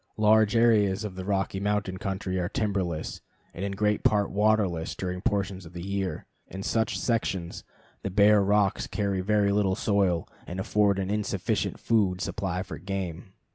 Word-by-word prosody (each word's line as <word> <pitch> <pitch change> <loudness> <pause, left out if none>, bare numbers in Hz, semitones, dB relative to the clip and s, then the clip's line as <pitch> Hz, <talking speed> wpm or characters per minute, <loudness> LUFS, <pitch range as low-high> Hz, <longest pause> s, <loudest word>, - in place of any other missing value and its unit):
Large 110 0 +4
areas 105 -4 +3
of 105 -3 -4
the 95 0 -6
Rocky 95 -1 -1
Mountain 100 -2 -1
country 95 -1 -2
are 90 - -1
timberless 95 -7 -2 0.3
and 90 - -6
in 100 0 -2
great 105 +1 0
part 105 -1 +2
waterless 100 -5 +1
during 90 -1 -4
portions 95 -2 -1
of 85 0 -12
the 85 -1 -6
year. 100 -1 -3 0.2
In 95 +1 -7
such 110 +2 0
sections 95 -7 -2 0.4
the - - -3
bare 105 +2 +5
rocks 100 0 +2
carry 100 -3 -1
very 100 +1 +2
little 100 -2 +2
soil 95 -6 +1 0.2
and 90 +2 -5
afford 100 0 +2
an 95 0 -2
insufficient 105 0 -1
food 100 -6 +1
supply 90 -1 -2
for 80 -6 -8
game. 95 -1 -5
100 Hz, 165 wpm, -27 LUFS, 95-105 Hz, 0.4 s, bare